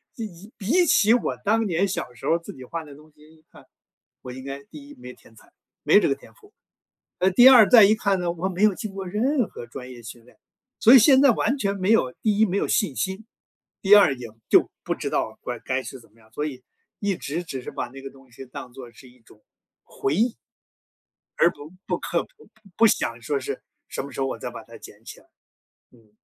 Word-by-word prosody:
一 225 -2 -5 0.2
一 215 - -14
比 270 - +2
起 225 -7 +4
我 245 - -2
当 225 +2 +1
年 190 +1 0
小 150 -8 -5
时 120 - -8
候 165 - +3
自 170 - -10
己 130 - -12
画 165 +6 -6
的 145 -2 -13
东 155 +2 -18
西 150 - -26
一 155 - -26
看， - - -17 0.6
我 125 - -9
应 130 +1 -10
该 140 0 -7
第 285 -1 -13
一 290 - -12
没 250 - -11
天 - - -22
才， - - -21 0.3
没 - - +5
这 - - +1
个 - - +2
天 - - -16
赋。 415 0 -22 0.7
呃， 185 - +3
第 245 +7 +8
二 240 -6 +8
再 235 -4 +8
一 210 +2 +5
看 200 -3 0
呢， 175 -1 -1
我 175 +2 -3
没 190 +1 -2
有 215 -2 +5
经 195 +1 -7
过 195 -1 -6
任 245 +7 0
何 120 - -10
专 125 +1 -10
业 120 -1 -12
训 115 +1 -11
练， 125 - -23 0.4
所 235 +4 +7
以 260 - +10
现 265 +4 +6
在 275 -3 +6
完 270 +5 0
全 200 -6 -1
没 190 +1 0
有 130 - +2
第 210 -1 0
一 220 - +6
没 190 -2 -3
有 - - 0
信 185 -11 0
心， 190 +7 -3 0.6
第 200 -1 +4
二 195 -10 +6
也 120 -2 -9 0.2
就 - - +4
不 - - -1
知 - - -4
道 - - -2
乖 120 -2 -6
该 130 0 -3
是 135 - -9
怎 115 - -21
么 115 - -25
样， 110 - -24
所 150 +6 -4
以 130 -4 -7 0.4
一 200 -3 -1
直 160 +5 -4
只 135 -6 -7
是 - - -8
把 120 - -5
那 135 +1 -12
个 135 - -8
东 135 -2 -20
西 130 +3 -11
当 125 0 -10
作 125 -2 -11
是 130 - -16
一 125 0 -23
种 110 -1 -22 0.8
回 210 - +2
忆。 235 -1 0 1.0
而 170 - +6
不 145 +1 -12 0.2
不 - - -2
刻 - - -2
不 485 -3 -21
不 220 - -32 0.2
不 230 - +6
想 115 - -1
说 140 +3 -2
是 130 - -6 0.3
什 - - -5
么 140 - -9
时 135 - -8
候 135 - 0
我 - - -4
再 - - -5
把 - - -10
它 - - -14
捡 - - -15
起 - - -11
来。 - - -25 0.7
嗯。 110 -3 -25
170 Hz, 265 characters per minute, -23 LUFS, 130-215 Hz, 1.0 s, 以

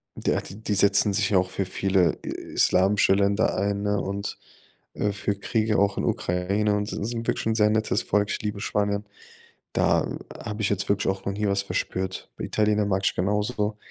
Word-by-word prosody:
der - - 0
die 105 +1 -4
setzen 100 +1 +4
sich 100 0 +1
ja 95 - +5
auch 90 - -1
für 95 +1 -2
viele, 95 -1 +1
äh, - - -5 0.2
islamische 95 +1 +4
Länder 100 +2 +2
ein, 100 +1 0
ne? 105 0 +1
Und, 100 +1 -4 0.6
äh, 105 - 0
für 100 0 -2
Kriege 110 0 +1
auch 100 -1 +2
in - - -1
Ukraine 100 +4 0
und 105 0 -2
s 105 - -3
sind 115 -1 -4
wirklich - - -1
'n 110 - +1
sehr 105 -1 +4
nettes 110 0 +1
Volk. 105 0 +1
Ich - - -2
liebe 105 -1 -3
Spanier. 105 -1 0 0.7
Da - - +1 0.2
habe 105 +1 -5
ich 105 - +1
jetzt 100 -2 -1
wirklich 100 -1 +1
auch 95 - -13
noch 100 - -1
nie 105 +1 -1
was 100 0 +1
verspürt. 95 -1 -3
Bei - - -4
Italienern 105 -1 +1
mag 95 0 +1
ich - - +2
genau 105 +3 +1
so. 105 -2 -2
100 Hz, 205 wpm, -25 LUFS, 100-105 Hz, 0.7 s, ja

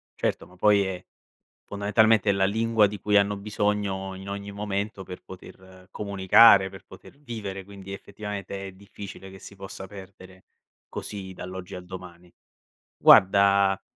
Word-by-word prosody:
Certo, - - -2
ma 90 - -19
poi 100 +1 +4
è 95 -1 -6 0.6
fondamentalmente 105 0 +3
la 95 0 +2
lingua 110 +1 +2
di 105 0 -7
cui 105 -1 +3
hanno 100 0 +2
bisogno 100 -2 -2
in 95 +1 -9
ogni 100 0 -6
momento 100 0 -4
per 90 0 -10
poter 95 0 -14
comunicare, 100 0 +5
per 95 +1 -13
poter 95 +8 -15
vivere, 105 -8 -6
quindi 100 -1 -11
effettivamente 100 -1 -7
è - - -9
difficile 100 0 -11
che 95 0 -13
si 100 - -12
possa 95 0 -9
perdere 95 -1 -13 0.4
così 95 -2 -7
dall'oggi 90 0 -8
al 90 - -8
domani. 90 -1 -11 0.7
Guarda, 100 0 +5
100 Hz, 140 wpm, -25 LUFS, 95-105 Hz, 0.7 s, comunicare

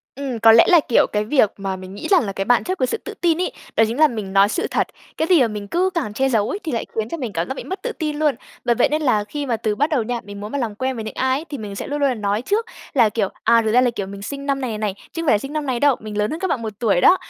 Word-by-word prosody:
Ừm, 265 -3 -4
có 225 0 +8
lẽ 230 0 +8
là, 345 - +7
kiểu, 235 - +4
cái 210 0 0
việc 220 -3 +3
mà 195 -1 -3
mình 185 0 -10
nghĩ 200 - -6
rằng 375 -3 +5
là 195 - -3
cái 195 0 -3
bạn 245 +3 +3
chất 370 +1 -2
của 255 - +2
sự 455 - -1
tự 435 - -6
tin 335 -2 +2
ấy, - - -2 0.2
đó 225 - +6
chính 230 +4 -4
là 310 0 +6
mình 215 -6 -5
nói 195 +1 +5
sự 355 - -1
thật, - - +1 0.3
cái 320 - -1
gì 355 -5 +5
mà 245 - +4
mình 210 -2 -6
cứ 365 - +1
càng 325 -12 -2
che 265 +5 +1
giấu 220 -5 +1
ấy - - -2
thì 315 - -3
lại 230 - -1
khiến 220 0 -2
cho 335 - -4
mình 250 -9 -5
cảm 165 0 -2
giác - - -3
bị - - -7
mất 380 - -6
tự - - -3
tin 310 -7 -3
luôn. 300 -2 +2 0.3
Bởi 240 -1 +3
vậy 235 - +3
nên 305 +1 0
là 220 -7 +2
khi 285 +7 -5
mà 240 -3 0
từ 220 -1 -1
bắt 290 +9 0
đầu 285 -7 +1
nha, 240 +1 -3
mình 200 0 -9
muốn 210 +1 -7
mà 285 - -1
làm 230 -5 -2
quen 260 +4 -2
với 225 - -5
những 215 - -6
ai 260 +4 0
thì 285 - -4
mình 210 -3 -6
sẽ - - -5
luôn 290 +1 -3
luôn 280 - +3
là 260 - 0
nói 210 0 -1
trước 425 - 0 0.3
là, 235 -5 +5
kiểu, 210 -2 -1 0.2
à, 230 0 +5
thực 220 -1 0
ra 245 - +6
là, 250 -1 +3
kiểu, 205 -4 -4
mình 200 +1 -9
sinh 280 +6 -6
năm 275 -1 0
này 235 -5 -3
này, 210 -3 -2 0.2
chứ 330 - -4
không - - -5
phải 215 - +5
sinh 275 +7 -7
năm 305 -1 -2
này 250 -3 -1
đâu, 285 -3 +4
mình 210 -1 -6
lớn 210 0 +1
hơn 320 - -4
các 380 - -1
bạn 255 -8 -1
1 220 -1 -4
tuổi 210 -7 +2
đó. 365 - +6
240 Hz, 350 wpm, -21 LUFS, 210-290 Hz, 0.3 s, có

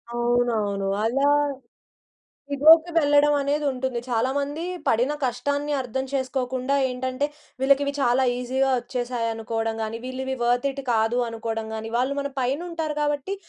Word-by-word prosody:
అవునవును. 235 -5 +1 0.2
అలా 275 +5 +2 1.2
ఇగో‌కి 320 +4 +6
వెళ్ళడం 290 -1 +4
అనేది 290 +2 0
ఉంటుంది. 255 -2 -3
చాలా 240 +2 +1
మంది 290 +3 -3 0.2
పడిన 245 +6 +2
కష్టాన్ని 285 +4 -1
అర్థం 260 +2 -3
చేసుకోకుండా, 260 0 -1
ఏంటంటే, 255 +2 -2 0.4
వీళ్ళకివి 280 +1 +3
చాలా 260 0 +3
ఈజీ‌గా 265 +2 0
వచ్చేసాయనుకోవడం 230 -2 -3
గాని, 220 +1 -4
వీళ్ళివి 265 +1 -3
వర్త్‌‌ 245 +3 +2
ఇట్ 275 +1 -6
కాదు 225 +2 +2
అనుకోడం 225 -1 -4
గాని. 220 +1 -6
వాళ్ళు 260 +3 0
మన 280 0 -4
పైనుంటారు 315 +4 -2
కాబట్టి, 295 +6 -1
260 Hz, 125 wpm, -24 LUFS, 240-280 Hz, 1.2 s, ఇగో‌కి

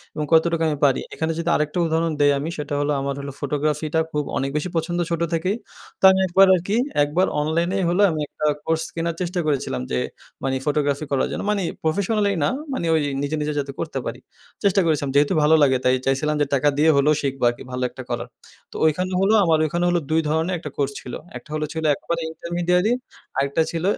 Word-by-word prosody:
এবং 150 - -2
কতটুক 165 +1 +3
আমি 155 - 0
পারি? 135 -2 +2
এখানে 160 0 -1
যদি 170 0 -1
আরেকটা 150 +3 -1
উদাহরণ 165 +1 0
দেই 145 0 +5
আমি 150 +3 -3
সেটা 145 -1 -4
হল 145 0 0
আমার 140 0 -2
হল 140 0 -6
ফটোগ্রাফিটা 150 +2 -1
খুব 150 0 -1
অনেক 135 - -1
বেশি 150 +4 -2
পছন্দ 170 +2 -1
ছোটো 170 0 0
থেকেই। 185 +5 0 0.4
তো - - -26
আমি 190 - +2
একবার 190 +2 +6
আর 175 - -1
কি 205 - +1 0.3
একবার 165 +6 +1
অনলাইনেই 170 +5 0
হলো 180 +4 +2
আমি 155 - -3
একটা 155 - -5 0.2
কোর্স 160 0 +1
কেনার 165 0 -2
চেষ্টা 180 0 -2
করেছিলাম 140 - -1
যে 65 - 0 0.5
মানে 135 0 0
ফটোগ্রাফি 145 0 0
করার 135 - +1
জন্য - - -3
মানে 200 -2 0 0.2
প্রফেশনালি 200 +5 +1
না - - +3 0.2
মানে 215 - -2
ওই 160 - +2 0.2
নিজে, 145 +2 -1
নিজে 150 0 -1
যাতে 140 -1 -3
করতে - - -3
পারি। - - -5 0.4
চেষ্টা 195 0 +4
করেছিলাম 150 -4 +1
যেহেতু 145 +5 +4
ভালো 155 +2 +5
লাগে 130 -2 +4
তাই 130 0 +4
চাইছিলাম 145 +3 +1
যে - - +4
টাকা 140 +2 +3
দিয়ে 155 +2 +4
হলেও 140 +2 +4
শিখবো 135 -2 -3
আর - - -2
কি - - -10
ভালো 125 0 -3
একটা - - -9
করার। - - -3 0.4
তো - - -15
ওইখানে 180 +4 +1
হলো 195 +3 +3
আমার 165 -3 +3
ওইখানে 175 +3 -1
হল 175 - +2
২ 160 +1 +3
ধরনের 160 +4 0
একটা 150 - -6
কোর্স 140 -1 0
ছিল। 125 - -9 0.2
একটা - - -15
হল 155 - -1
ছিল 160 0 -4
একেবারে 170 +3 -3
ইন্টারমিডিয়ারি 175 +4 0 0.5
আরেকটা 140 +3 +1
ছিল 165 -1 -3
155 Hz, 215 wpm, -22 LUFS, 145-170 Hz, 0.5 s, একবার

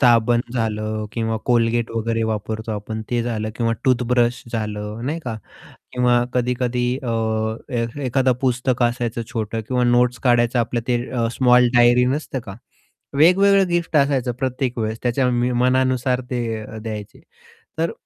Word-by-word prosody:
साबण 120 -1 +4
झालं 110 -2 -2
किंवा 115 -1 -1
Colgate 115 -1 +2
वगैरे 115 0 -1
वापरतो 110 0 -3
आपण 110 +1 -5
ते 120 -1 +1
झालं 110 -2 -3
किंवा 115 -1 +1
टूथब्रश 125 -2 +2
झालं 105 0 -4
नाही 155 +4 -2
का. 120 -7 -5 0.6
किंवा 125 -1 +3
कधी-कधी 125 0 0
अ, 125 -3 -4 0.6
ए 120 -2 0 0.2
एखादं 130 +1 +2
पुस्तक 125 -1 0
असायचं 120 -1 0
छोटं 110 0 -2
किंवा 125 -1 +1
नोट्स 120 0 +3
काढायचं 120 0 +3
आपलं 120 +1 0
ते 125 - +3
अ, 120 -2 0
स्मॉल 125 -1 +4
डायरी 120 +1 +5
नसतं 145 -3 -4
का? 105 -5 -9 0.6
वेगवेगळं 195 +3 +5
गिफ्ट 175 -2 0
असायचं 140 -3 +2
प्रत्येक 130 -1 -2
वेळेस. 110 0 -2
त्याच्या 125 +1 +1
मी 120 0 +1
मनानुसार 130 0 +1
ते 120 -2 -1 0.2
अ, 110 +1 -9
द्यायचे. 110 -2 -7 0.6
तर 165 0 +1
120 Hz, 145 wpm, -21 LUFS, 115-125 Hz, 0.6 s, डायरी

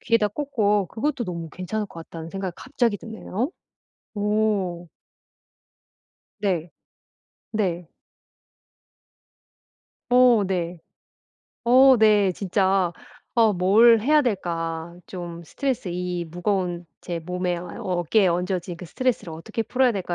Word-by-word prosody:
귀에다 230 -2 +2
꽂고 210 -5 0
그것도 240 - -2
너무 170 -4 -5
괜찮을 195 +6 -3
것 170 - -10
같다는 165 0 -8
생각이 195 -2 -4
갑자기 240 -5 0
드네요. 225 - -4 0.6
오. 205 -5 0 1.5
네. 180 -5 -1 0.8
네. 180 -6 -1 2.2
어 245 -3 +6
네. 175 -2 -2 0.9
어 260 +2 +7
네. 210 -3 +5
진짜 190 -1 +1 0.4
어 225 -3 +5
뭘 215 +6 +5
해야 300 +6 +4
될까 170 - -2
좀 175 -2 -7
스트레스 255 - -2
이 180 -1 -3
무거운 175 0 -2 0.2
제 175 -2 -4
몸에 180 +1 -2
어 175 +1 -8
어깨에 185 0 +1
얹어진 180 0 -2
그 180 - -8
스트레스를 235 -5 -1
어떻게 165 +8 -4
풀어야 255 +2 +2
될까 185 -4 -3
190 Hz, 220 characters per minute, -24 LUFS, 175-220 Hz, 2.2 s, 어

